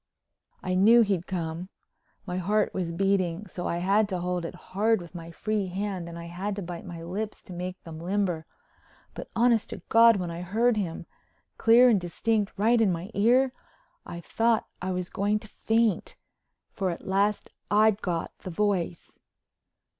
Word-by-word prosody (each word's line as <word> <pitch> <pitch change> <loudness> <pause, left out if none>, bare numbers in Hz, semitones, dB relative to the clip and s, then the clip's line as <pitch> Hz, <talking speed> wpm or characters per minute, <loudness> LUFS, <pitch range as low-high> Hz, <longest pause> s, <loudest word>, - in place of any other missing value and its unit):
I 185 - -1
knew 220 +6 +6
he'd 195 -5 0
come. 170 0 -4 0.6
My 180 -2 -3
heart 210 +4 +1
was 180 -3 -2
beating 190 0 0
so 180 -2 -5
I 170 - -1
had 200 +4 +2
to 185 -2 -2
hold 180 -1 -2
it 170 - -6
hard 215 +5 0
with 175 -1 -11
my 165 -2 -8
free 205 +3 -2
hand 185 -2 -4
and 170 - -8
I 170 - -7
had 185 +4 -4
to 200 - -5
bite 175 0 -7
my 170 -2 -7
lips 205 +5 -5
to 190 - -10
make 180 +1 -5
them 160 -1 -9
limber. 180 -2 -1 0.7
But, - - -8
honest 235 -1 +3
to - - -8
God, 230 0 +7
when 180 -3 -3
I 170 +1 -6
heard 225 +6 +2
him—clear 225 +5 +1
and 210 -5 +3
distinct 205 +4 -1
right 225 +3 +3
in 205 -4 +4
my 175 +4 -4
ear—I 250 - -1
thought 225 +5 +1 0.2
I 185 - -3
was 180 -1 -3
going 205 +2 +1
to 215 - -10
faint. 225 -1 0 0.6
For 190 -3 -2
at 170 - -6
last 200 +2 +1 0.2
I'd 215 0 +4
got 170 -3 -3
the - - -7
Voice! 180 -2 -1
190 Hz, 170 wpm, -27 LUFS, 175-215 Hz, 0.7 s, God